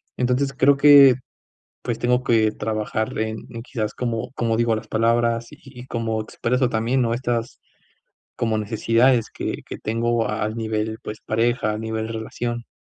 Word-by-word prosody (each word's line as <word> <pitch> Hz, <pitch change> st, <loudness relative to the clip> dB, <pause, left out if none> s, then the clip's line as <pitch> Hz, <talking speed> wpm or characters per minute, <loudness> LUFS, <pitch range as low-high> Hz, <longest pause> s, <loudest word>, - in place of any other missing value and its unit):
entonces 125 Hz, +2 st, 0 dB
creo 140 Hz, +1 st, +4 dB
que 140 Hz, -2 st, +8 dB, 0.7 s
pues, 120 Hz, -2 st, -3 dB
tengo 125 Hz, +1 st, +1 dB
que 110 Hz, -4 st, +3 dB
trabajar 110 Hz, 0 st, -3 dB
en 110 Hz, 0 st, -2 dB
en 115 Hz, -1 st, -7 dB
quizás 110 Hz, -4 st, -3 dB
como 115 Hz, -2 st, -3 dB
como 115 Hz, -3 st, 0 dB
digo 115 Hz, -1 st, +2 dB
las 110 Hz, -, -6 dB
palabras, 115 Hz, +1 st, +1 dB
y -, -, -13 dB
y 130 Hz, -2 st, -11 dB
cómo 115 Hz, -3 st, -2 dB
expreso 125 Hz, +3 st, -1 dB
también, 115 Hz, +4 st, 0 dB
¿no?, 115 Hz, -1 st, +1 dB
estas 120 Hz, -1 st, -2 dB, 0.8 s
como 110 Hz, -2 st, 0 dB
necesidades 115 Hz, +3 st, +2 dB
que -, -, -4 dB
que -, -, -7 dB
tengo 115 Hz, +1 st, 0 dB
al 105 Hz, +1 st, -2 dB
nivel, 110 Hz, -1 st, -2 dB
pues, 105 Hz, 0 st, -7 dB
pareja, 115 Hz, 0 st, +1 dB
a 105 Hz, -, -3 dB
nivel 110 Hz, 0 st, -3 dB
relación. 120 Hz, +1 st, -4 dB
115 Hz, 160 wpm, -22 LUFS, 110-120 Hz, 0.8 s, que